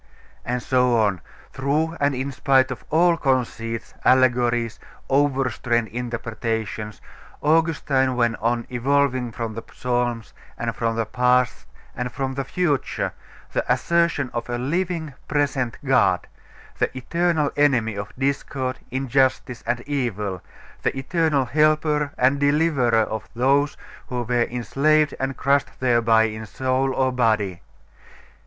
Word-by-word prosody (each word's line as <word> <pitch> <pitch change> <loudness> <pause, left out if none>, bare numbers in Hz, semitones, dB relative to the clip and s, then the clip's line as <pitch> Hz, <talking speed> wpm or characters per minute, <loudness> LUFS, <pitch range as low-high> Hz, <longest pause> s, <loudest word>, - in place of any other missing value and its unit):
And 125 0 -2
so 125 -2 +3
on, 100 -6 +1 0.3
through 150 +5 0
and 140 -1 +2
in 135 +2 -3
spite 130 0 +3
of 130 - -6
all 170 +2 +4
conceits, 115 -5 -1
allegories, 120 -3 +3 0.3
overstrained 130 -5 +1
interpretations, 115 -2 -4 0.4
Augustine 150 -4 +2
went 120 -2 +1
on 120 +1 0
evolving 130 -1 +1
from 115 0 -4
the 115 - -5
Psalms, 120 -2 -2 0.2
and - - -3
from 115 -1 -1
the 115 0 0
past, 125 0 +1 0.3
and 125 0 -3
from 135 +2 -3
the 135 +1 -2
future, 145 0 -1 0.4
the - - 0
assertion 170 -6 +1
of 120 0 -4
a 120 - -1
Living, 160 +3 -2
Present 140 -5 0
God, - - +3 0.5
the - - +2
eternal 160 +2 0
enemy 125 -7 +2
of 100 0 -5
discord, 135 -1 -2
injustice, 130 -1 0
and 120 0 0
evil, 110 - -2 0.4
the - - -1
eternal 145 0 +1
helper 150 +1 +2
and 130 +3 +3
deliverer 145 -6 +3
of 110 0 -5
those 140 +4 +2 0.3
who 125 -1 -2
were 120 0 +1
enslaved 140 +6 +1
and 135 0 -2
crushed 140 +1 +1
thereby 115 -3 +4
in 110 0 -3
soul 130 +4 0
or 130 -1 +2
body.... 110 -7 +1
130 Hz, 125 wpm, -23 LUFS, 120-140 Hz, 0.5 s, all